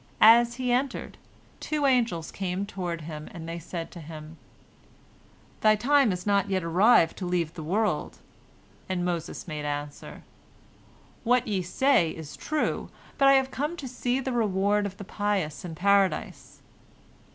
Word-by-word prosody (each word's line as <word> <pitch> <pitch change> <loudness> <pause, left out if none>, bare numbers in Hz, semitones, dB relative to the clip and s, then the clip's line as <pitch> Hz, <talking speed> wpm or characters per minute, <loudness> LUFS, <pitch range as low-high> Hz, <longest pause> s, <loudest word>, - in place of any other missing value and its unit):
As 235 +2 +7
he 250 -1 -1
entered, 255 +2 -1 0.4
two 300 -2 -1
angels 235 -11 +1
came 190 0 -3
toward 175 -4 -4
him, 155 -1 -7
and 165 -3 -8
they 170 +1 -5
said 170 0 -6
to 175 - -10
him, 155 0 -10 1.2
"Thy 215 0 +5
time 270 +2 +3
is 180 0 -4
not 200 -1 +2
yet 190 -2 0
arrived 170 +1 +4
to 185 - -4
leave 170 -3 -1
the 170 - -7
world," 205 +7 -1 0.7
and 180 -1 -1
Moses 170 -1 -4
made 150 -2 -5
answer, 145 0 -5 1.0
"What 250 +1 +2
ye 200 -3 0
say 180 - +2
is 155 -3 -9
true, 310 0 -2 0.3
but 275 - +6
I 275 - +8
have 265 0 +3
come 300 +5 -3
to 280 - -6
see 250 +1 -1
the 265 -1 -3
reward 205 -2 +1
of 195 0 -10
the - - -7
pious 200 -6 -2
in 170 -3 -6
Paradise." 195 +2 0
195 Hz, 155 wpm, -27 LUFS, 170-240 Hz, 1.2 s, I